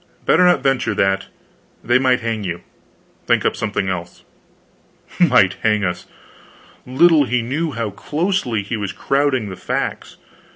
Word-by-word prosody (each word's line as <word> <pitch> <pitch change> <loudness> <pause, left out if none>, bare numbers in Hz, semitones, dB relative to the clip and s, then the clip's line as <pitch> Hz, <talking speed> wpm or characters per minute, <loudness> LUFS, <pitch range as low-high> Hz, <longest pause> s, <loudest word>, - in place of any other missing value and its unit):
Better 180 - +4
not 180 0 +3
venture 130 -5 0
that. 95 -1 0 0.6
They 120 +2 +3
might 130 -1 +2
hang 115 -2 -3
you. 85 -2 -4 0.7
Think - - +2
up - - +1
something 95 - -2
else." 90 -2 -5 1.0
Might 125 - +4
hang 105 -2 +1
us! 90 -1 -3 0.8
Little 150 +3 +4
he 125 -1 -1
knew 145 +6 -2
how 115 -3 -3
closely 150 - -2
he 100 +3 -4
was 100 -2 -4
crowding 135 -6 0
the 95 - -7
facts. - - -4
120 Hz, 140 wpm, -19 LUFS, 100-140 Hz, 1.0 s, Better